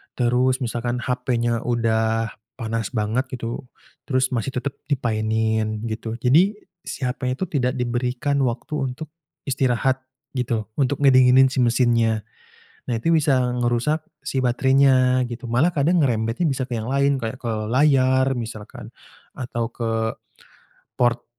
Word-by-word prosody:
terus 125 +1 +2
misalkan 120 +1 -2
HP-nya 125 -2 -1
udah 115 -2 0 0.2
panas 115 -1 -3
banget 110 +5 0
gitu, 120 +1 -5 0.4
terus 130 -1 +1
masih 125 +2 -2
tetap 130 +3 -2 0.2
dimainin, 110 -4 0
gitu. 110 +1 -4
Jadi 155 - +3 0.3
si - - -5
HP-nya 125 0 -1
itu 140 - -4
tidak 125 -3 0
diberikan 125 +3 -1
waktu 125 +5 -3 0.2
untuk 155 +3 -9 0.3
istirahat 130 -1 +1 0.3
gitu, 120 -4 -1 0.2
untuk 140 +1 +1
ngedinginin 130 -1 +6
si 135 - -2
mesinnya, 115 -2 +2 0.6
nah, 120 -3 -2
itu 165 +8 +2
bisa 145 -4 +3 0.2
ngerusak 125 +6 0 0.2
si 130 -1 -2
baterainya, 130 0 +3
gitu. 120 +1 -6
Malah 125 +9 +2
kadang 165 +2 +2
ngerembetnya 115 +3 0
bisa 135 -4 0
ke 125 - -3
yang 115 +2 -3
lain, 140 +1 +2
kayak 115 +3 -4
ke 120 - -3 0.2
layar 130 -1 +3
misalkan, 110 -3 -7 0.4
atau 120 -2 -4
ke 115 -1 -2 1.0
port 120 -1 +2
125 Hz, 130 wpm, -22 LUFS, 115-130 Hz, 1.0 s, ngedinginin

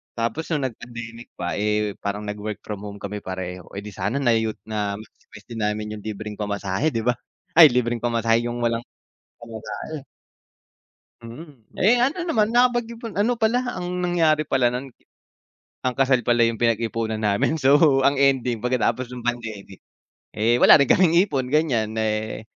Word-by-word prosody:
Tapos 115 +7 -2
nung 150 -5 -1
nag 125 -4 -4
pandemic 120 -1 -9
pa, 85 - -3
eh, 105 -1 -1
parang 100 +1 -4
nag-work 105 0 -6
from 105 -2 -6
home 100 0 -8
kami 105 +1 -6
pareho, 90 -1 -6
eh 100 - -5
di 105 - -8
sana 120 +8 -2
na 120 - +4
u 110 -1 -2
na-maximize 105 -1 -6
din 115 - -5
namin 105 0 -2
'yung 105 - -12
libreng 105 0 -6
pamasahe, 100 +4 -2
'di 115 - -1
ba? 125 - +3 0.4
Ay 165 -1 +9
libreng 120 -1 +1
pamasahe, 115 0 +1
yung 120 0 -4
walang 115 0 -1 0.5
pamasahe. 120 +6 -7 1.2
Mm. 135 +7 -10 0.2
Eh, 240 +6 +4
ano 300 +8 0
naman 220 -11 +1
nakapag 240 0 +2
ipon 230 -1 -7
ano 215 +5 +1
pala, 230 +2 +2 0.2
ang 180 0 -4
nangyari 165 -4 +2
pala 125 -3 +2
nun 130 +2 -4 1.0
ang 125 - 0
kasal 135 -1 +3
pala 120 -1 +3
yung 115 -1 +1
pinagipunan 115 -1 0
namin, 105 +8 +1
so 140 0 +5
ang 140 0 +3
ending 130 -4 +2
pagkatapos 125 0 0
ng 125 0 -8
pandemic, 110 -5 -5 0.6
eh, 115 +3 +2
wala - - +8
rin 140 - -2
kaming 175 -3 +4
ipon 135 -9 -2
ganiyan, 125 -7 +1
eh, 110 0 -2
120 Hz, 165 wpm, -23 LUFS, 105-140 Hz, 1.2 s, Ay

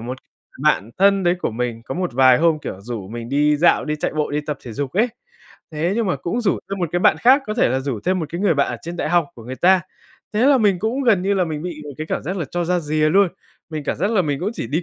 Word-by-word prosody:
một 125 +3 -6 0.4
bạn 120 -8 +2
thân 195 0 +4
đấy 175 0 +3
của - - -1
mình, 115 0 -3
có - - -6
một 180 -6 -2
vài 130 0 +5
hôm, 165 -1 +3
kiểu, 95 -9 -7
rủ 105 -3 -6
mình 115 +1 -7
đi 150 +2 +2
dạo, 170 +4 +3
đi 150 0 -2
chạy - - -2
bộ, 150 -1 -1
đi 150 +1 -1
tập 150 -3 -3
thể 120 - -7
dục 140 +2 -4
ấy, 225 +6 +2 0.6
thế 165 +5 -1
nhưng 230 -3 0
mà 180 - 0
cũng 175 - -3
rủ 210 - +1
thêm 195 - -3
một 175 -3 -1
cái 175 - +2
bạn - - +4
khác, 265 +4 +5
có 215 - -3
thể 230 - +3
là 130 +2 0
rủ 130 -6 -3
thêm 185 0 +1
một 160 - -3
cái 170 +3 -5
người 190 -6 +3
bạn 140 - +1
ở - - -3
trên 170 +1 -6
đại - - -2
học 175 -3 +2
của 115 - -12
người 130 +2 -6
ta. 185 +1 +4 0.5
Thế 225 +5 +2
là 280 -2 +5
mình 200 -5 +3
cũng 235 +7 -1
gần 210 -7 +3
như 200 +1 +1
là 185 -2 +2
mình 155 -2 -4
bị 170 -4 -6
một 145 - -7
cái 155 - -4
cảm - - -3
giác 190 +2 -4
là 170 - -2
cho 175 -1 -1
ra 180 +1 +1
rìa 155 0 +1
luôn, 195 +1 +4 0.4
mình 155 -2 -5
cảm - - -2
giác 200 +7 0
là 200 -5 +2
mình 145 -1 -2
cũng 195 - -1
chỉ - - -4
đi 155 +8 -1
165 Hz, 305 wpm, -21 LUFS, 140-190 Hz, 0.6 s, vài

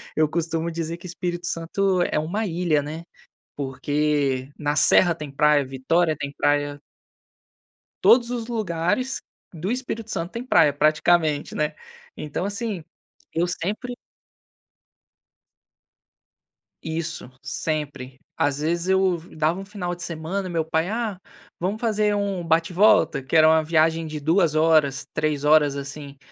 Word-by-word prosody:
Eu 155 -1 +3
costumo 165 0 -1
dizer 165 0 -4
que 175 +2 -10
Espírito 175 0 -4
Santo 180 +3 0
é - - 0
uma 200 +8 -2
ilha, 170 -4 +1
né, 155 +3 -6 0.5
porque 140 -1 -1
na 145 0 0
serra 170 +2 +5
tem 150 -3 -7
praia, 145 0 +3
Vitória 155 +5 +1
tem 140 0 -5
praia. 145 0 +1 1.2
Todos 240 -1 +6
os 235 -2 -3
lugares 220 +3 -1 0.3
do 170 +6 -3
Espírito 235 -3 -4
Santo 170 +1 -3
têm 235 - -4
praia 150 - +4
praticamente, 155 +1 +2
né? 150 0 0 0.4
Então, 150 +3 -4
assim, 200 -2 -3 0.5
eu 170 +2 +1
sempre 210 +8 -3 2.9
Isso, 160 -4 -4
sempre. 140 -3 -4 0.2
Às 145 0 0
vezes, 170 +3 -1
eu 190 -2 +3
v 165 +1 -15
dava 155 +3 +1
um - - -6
final 185 -3 -4
de 175 - -9
semana 170 +4 -4
e - - -6
meu 165 -2 0
pai: 160 +2 0
"Ah, 220 -3 -2 0.4
vamos 195 +5 -2
fazer 215 -2 +1
um 200 -3 -1
bate-volta", 165 -1 +3
que 140 +5 +1
era 155 0 +7
uma 160 0 +5
viagem 160 +1 +2
de 155 -1 -5
2 165 +2 +2
horas, 155 -3 +3
3 150 -1 -1
horas, 150 -2 +4
assim. 140 0 -7
165 Hz, 140 wpm, -24 LUFS, 150-185 Hz, 2.9 s, era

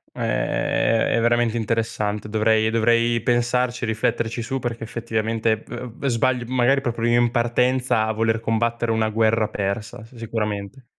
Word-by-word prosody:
Ehm, 115 0 0
è - - +3
veramente 120 0 +2
interessante. 110 -2 -2
Dovrei 110 0 +2
dovrei 115 +1 +2
pensarci 120 +1 0
e - - -1
rifletterci 110 +1 -1
su 135 +3 -3
perché 115 -2 -4
effettivamente 115 -1 -1
v 125 +1 -7
v - - -3
sbaglio 125 0 +1
magari 130 +2 +2
proprio 120 -3 -2
io 120 +1 +4
in 120 - +2
partenza 120 0 +1
a 110 - 0
voler 115 0 0
combattere 115 +1 0
una 110 -1 +1
guerra 110 0 +2
persa, 110 +3 -4
s 115 - -18
sicuramente. 110 +1 -4
115 Hz, 155 wpm, -22 LUFS, 110-120 Hz, -, io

